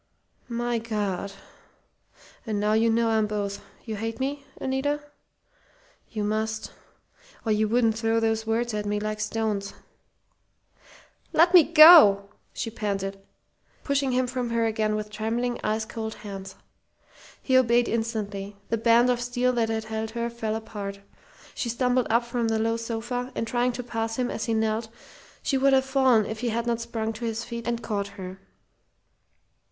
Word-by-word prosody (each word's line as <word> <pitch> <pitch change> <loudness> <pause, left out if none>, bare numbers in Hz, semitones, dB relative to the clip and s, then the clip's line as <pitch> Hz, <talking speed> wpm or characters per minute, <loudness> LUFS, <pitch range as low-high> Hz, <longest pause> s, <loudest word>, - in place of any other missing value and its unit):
"My 240 0 -1
God! 205 -4 -3 1.1
And 210 -2 -1
now 210 +1 +1
you 225 +1 +3
know 230 0 +2
I'm 220 -1 +2
both, 205 -1 -3 0.2
you 220 -3 -4
hate 225 +3 -4
me, 280 +2 -2 0.2
Anita? 270 +3 -1 1.1
You 215 -2 -3
must, 220 +1 -2 0.7
or 220 - +1
you 215 0 +2
wouldn't 225 -1 +2
throw 225 0 +2
those 225 0 0
words 230 +1 0
at 210 -1 -2
me 205 0 0
like 215 0 -3
stones." 215 -2 -2 1.6
"Let 345 +3 +5
me 360 - +10
go," 295 - +8 0.2
she 225 - -4
panted, 195 -3 -3 0.6
pushing 280 -2 0
him 255 +1 +2
from 250 -1 -3
her 230 0 +1
again 215 -1 0
with 210 0 -4
trembling, 230 +3 -2
ice 220 +1 0
cold 220 -1 -5
hands. 195 -2 -8 0.8
He 260 - 0
obeyed 240 -2 +4
instantly. 210 -3 -3
The 230 - 0
band 235 +2 +5
of 240 -1 -1
steel 245 +1 0
that 230 -2 +1
had 220 0 -1
held 220 0 -4
her 235 0 -1
fell 225 -2 -3
apart. 205 -3 -6 0.5
She 240 - -3
stumbled 250 +1 +1
up 235 +1 +2
from 235 -1 -1
the 225 0 +1
low 225 +1 +1
sofa, 235 +2 -4
and - - -1
trying 245 +2 +1
to 250 +1 -5
pass 225 -1 -3
him 250 -1 -1
as - - -3
he 230 - 0
knelt, 220 +1 0 0.5
she 270 - +1
would 275 +1 +4
have 265 0 +4
fallen 265 -5 +3
if 220 +1 -5
he 240 0 -1
had 230 +1 -1
not 235 -1 -1
sprung 225 -1 -3
to 230 +2 -6
his 225 0 -2
feet 235 0 -6
and 235 0 -2
caught 200 -2 -2
her. 185 0 -7
225 Hz, 165 wpm, -26 LUFS, 215-240 Hz, 1.6 s, me